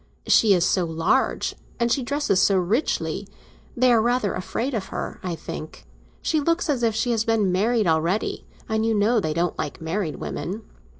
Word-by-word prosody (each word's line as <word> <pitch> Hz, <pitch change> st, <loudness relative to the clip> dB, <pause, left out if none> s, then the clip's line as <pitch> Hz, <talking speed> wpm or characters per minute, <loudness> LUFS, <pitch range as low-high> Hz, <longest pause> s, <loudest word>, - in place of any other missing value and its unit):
She 210 Hz, -4 st, +5 dB
is 175 Hz, -1 st, +2 dB
so 185 Hz, 0 st, +2 dB
large, 165 Hz, +11 st, +1 dB, 0.3 s
and 235 Hz, 0 st, +1 dB
she 270 Hz, -, +2 dB
dresses—so 240 Hz, -8 st, +2 dB
richly. 200 Hz, -, -1 dB, 0.5 s
They 250 Hz, 0 st, +5 dB
are 225 Hz, -, +4 dB
rather 240 Hz, -3 st, +1 dB
afraid 240 Hz, +8 st, -3 dB
of 210 Hz, -5 st, -2 dB
her, -, -, -5 dB
I 180 Hz, -2 st, -3 dB
think; 155 Hz, 0 st, -8 dB, 0.4 s
she 315 Hz, -, +1 dB
looks 335 Hz, +1 st, +1 dB
as 260 Hz, -4 st, -1 dB
if 225 Hz, -2 st, +1 dB
she 230 Hz, +2 st, 0 dB
had 225 Hz, -2 st, +1 dB
been 215 Hz, -4 st, +2 dB
married 215 Hz, +4 st, +2 dB
already, 165 Hz, +5 st, 0 dB, 0.2 s
and 220 Hz, 0 st, 0 dB
you 225 Hz, 0 st, +1 dB
know 220 Hz, +3 st, +3 dB
they 155 Hz, -6 st, -2 dB
don't 175 Hz, 0 st, -1 dB
like 145 Hz, -, -4 dB
married 165 Hz, 0 st, -2 dB
women. 205 Hz, +5 st, -5 dB
215 Hz, 180 wpm, -24 LUFS, 180-240 Hz, 0.5 s, She